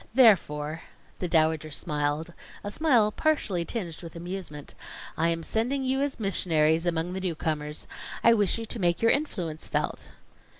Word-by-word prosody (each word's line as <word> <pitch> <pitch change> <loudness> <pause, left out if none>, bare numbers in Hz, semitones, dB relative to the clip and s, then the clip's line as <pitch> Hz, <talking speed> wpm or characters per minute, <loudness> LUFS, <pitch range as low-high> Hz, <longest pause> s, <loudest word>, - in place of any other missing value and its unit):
Therefore 160 - +4 0.2
" - - -31
The 180 - -1
Dowager 160 -1 +2
smiled, 150 +2 -2 0.3
a 205 - -4
smile 240 -7 +3
partially 215 - 0
tinged 175 -8 -4
with 165 -2 -10
amusement 175 -4 -6 0.4
"I 165 - +2
am 165 0 -1
sending 245 - 0
you 265 +1 0
as 285 -3 -1
missionaries 165 -5 +3
among 170 +1 -1
the 190 - -4
newcomers. 155 -4 -2 0.4
I 230 - +7
wish 205 -3 +2
you 230 - -4
to 230 - -4
make 175 +1 +1
your 230 - +6
influence 180 - -2
felt." - - -2
175 Hz, 160 wpm, -27 LUFS, 160-225 Hz, 0.4 s, I